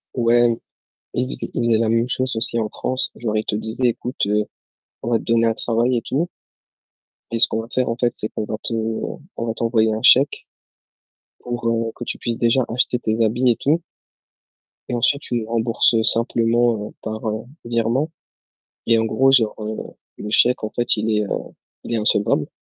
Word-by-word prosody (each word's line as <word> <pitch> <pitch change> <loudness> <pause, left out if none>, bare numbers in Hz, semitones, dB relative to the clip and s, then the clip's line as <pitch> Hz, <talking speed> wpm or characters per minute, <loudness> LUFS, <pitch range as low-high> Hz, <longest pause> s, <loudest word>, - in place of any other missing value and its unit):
Ouais, 120 0 +4 0.7
ils 125 +1 -2
fai - - -5
ils 120 - 0
faisaient 115 -2 +4
la 115 -1 +1
même 115 +2 +2
chose 130 0 -1
aussi 115 +1 -1
en 110 -1 0
France, 130 0 -2
genre 110 -2 -2
ils 110 - 0
te - - -2
disaient: 110 +4 0
«Écoute, 125 +3 -3
heu, 105 +1 +2 0.6
on 120 - -2
va 115 - +3
te - - -10
donner 115 0 +3
un 115 - +3
travail 120 +2 +1
et - - -1
tout» 150 +9 -1 1.0
«et 115 - -1
ce - - +6
qu'on 110 - -2
va 115 - -9
faire, 130 -2 +1
en 115 - 0
fait, 120 -1 +2
c'est 110 - -4
qu'on 110 - -4
va 110 - -3
te 115 - -2
on 115 +8 -2 0.2
on 115 - -2
va 115 - -1
t'envoyer 115 -1 +2
un 110 - -3
chèque 135 +3 +5 0.9
pour, 120 -1 -4
heu, 115 0 0
que 120 - -7
tu - - -4
puisses 115 -1 -2
déjà 120 +2 +3
acheter 125 +1 0
tes 110 0 0
habits 120 +3 +2
et 115 - -1
tout» 160 +4 +2 1.1
«et - - -2
ensuite 135 +4 +2
tu 120 - -4
les 115 -2 -1
rembourses, 115 +1 +2
heu, 110 - +3
simplement 115 -2 +1
heu, - - -16
par 110 +1 -4
heu, 110 +2 -3 0.2
virement.» 120 +6 0 0.8
et 115 -1 +4
en 110 - +2
gros, 130 +5 +3
genre, 115 -5 +4
heu, 110 +1 -4 0.4
le 105 - -5
chèque, 125 +1 +3
en 110 - -3
fait, 120 -2 0
il 110 0 0
est 105 - +2
heu, - - -7 0.6
il - - -5
est - - +2
insolvable. 105 -6 +2
115 Hz, 210 wpm, -21 LUFS, 110-120 Hz, 1.1 s, ce